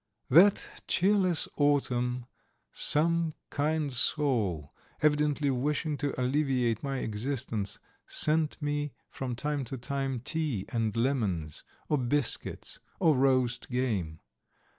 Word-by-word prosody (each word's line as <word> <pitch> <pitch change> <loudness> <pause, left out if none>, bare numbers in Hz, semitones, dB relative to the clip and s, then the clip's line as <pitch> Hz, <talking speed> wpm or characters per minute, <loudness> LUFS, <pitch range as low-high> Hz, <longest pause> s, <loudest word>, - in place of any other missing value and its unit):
That 185 +8 +6 0.2
cheerless 185 -2 +2
autumn 125 -4 +1 0.5
some 165 +1 +2 0.2
kind 150 -1 0
soul, 115 - 0 0.3
evidently 150 -1 +2
wishing 150 +4 -1
to 140 -1 -3
alleviate 125 -4 +1
my 135 -1 -3
existence, 115 -2 -3 0.3
sent 155 0 +2
me 145 -1 -2 0.2
from 125 -2 -4
time 145 +2 -2
to 135 +1 -6
time 135 +1 -2
tea 150 - -1
and 115 -2 -1
lemons, 105 - -1 0.2
or 150 - +1
biscuits, 130 +3 -1 0.2
or 160 -3 +4
roast 130 -2 +1
game. 105 -11 -2
135 Hz, 105 wpm, -29 LUFS, 120-150 Hz, 0.5 s, That